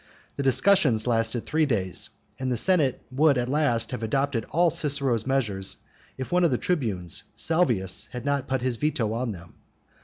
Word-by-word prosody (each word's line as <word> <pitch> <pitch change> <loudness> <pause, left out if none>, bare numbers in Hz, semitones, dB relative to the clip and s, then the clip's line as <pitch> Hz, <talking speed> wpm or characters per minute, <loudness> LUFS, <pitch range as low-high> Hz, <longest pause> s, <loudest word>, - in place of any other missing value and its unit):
The - - -3
discussion 140 - +4
lasted 115 -1 0
three 155 0 +1
days, 95 -8 -1 0.3
and 130 -1 -2
the 120 - 0
senate 155 - +1
would 140 +1 +3
at 120 0 -1
last 130 -5 +1
have 125 -3 -4
adopted 130 +1 -1
all 170 +2 +3
Cicero's 140 -7 0
measures 110 -8 -1 0.4
if 130 -1 -6
one 180 0 +3
of 170 - +4
the 125 - +1
tribunes, 110 - -2
Salvius, 120 - +1
had 125 +1 -7
not 140 -1 0
put 130 -2 -1
his 125 -2 -1
veto 130 -7 0
on 120 0 -2
them. 85 -3 -11
130 Hz, 175 wpm, -26 LUFS, 115-150 Hz, 0.4 s, discussion